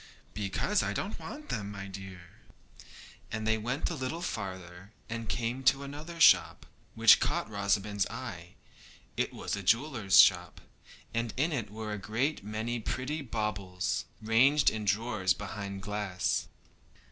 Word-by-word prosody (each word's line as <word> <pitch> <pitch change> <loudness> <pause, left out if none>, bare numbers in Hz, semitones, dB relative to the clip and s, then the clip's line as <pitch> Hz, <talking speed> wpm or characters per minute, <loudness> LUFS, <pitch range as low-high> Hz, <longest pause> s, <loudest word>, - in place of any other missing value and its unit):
'Because 105 - 0
I - - -1
don't 200 - -4
want 300 +1 -9
them, 100 -3 -3
my 100 -1 -6
dear.' 95 -2 -10 0.9
They 110 0 0
went 125 +10 -2
a - - -2
little 155 +4 -4
farther, 95 - -6 0.2
and 115 -2 -4
came 120 +3 -2
to 135 +2 +4
another 150 +4 -8
shop, 165 - +5 0.3
which - - +7
caught - - 0
Rosamond's 100 -1 0
eye. 100 -7 -8 0.6
It - - 0
was - - -3
a 100 - -5
jeweller's 115 0 +3
shop, 90 -1 +5 0.5
and 115 0 -2
in 155 +6 +1
it 120 -8 -2
were 110 0 -5
a 105 - -4
great 120 +7 -1
many 110 +3 -3
pretty 130 +7 -3
baubles, 105 -7 -2 0.2
ranged 130 +7 +4
in 110 -1 -4
drawers 100 -2 +1
behind 100 -1 -6
glass. 105 -3 -1
110 Hz, 140 wpm, -30 LUFS, 100-130 Hz, 0.9 s, which